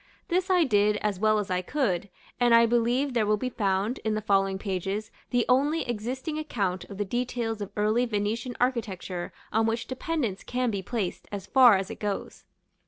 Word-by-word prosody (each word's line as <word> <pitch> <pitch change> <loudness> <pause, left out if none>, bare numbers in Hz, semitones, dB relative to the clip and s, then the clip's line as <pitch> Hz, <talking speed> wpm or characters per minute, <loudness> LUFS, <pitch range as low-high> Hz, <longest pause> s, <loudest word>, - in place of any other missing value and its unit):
This 365 +2 +1
I 365 -2 +5
did 210 -5 +3
as 205 -3 -2
well 215 +1 +3
as 205 -3 -2
I 180 0 +1
could, 200 - -1 0.3
and 240 -1 +5
I 230 0 +7
believe 240 +4 +1
there 225 -3 +1
will 210 0 +3
be 255 +4 -3
found, 200 +3 0
in 220 -1 -1
the - - 0
following 195 -1 +2
pages, 195 +2 -3 0.2
the 245 -2 +2
only 285 +4 +2
existing 255 +7 -3
account 200 -12 -2
of 200 - -10
the 205 - -1
details 235 0 -2
of 200 - -4
early 215 +4 +2
Venetian 225 +3 -2
architecture 200 -8 -2 0.2
on 220 +1 +3
which 225 +1 -1
dependence 260 - -3
can 250 -1 -1
be 200 -2 -2
placed, 200 -2 -3
as 200 -2 -5
far 245 -3 +7
as 195 +3 -4
it - - -8
goes. 205 -2 -4
220 Hz, 190 wpm, -27 LUFS, 200-250 Hz, 0.3 s, I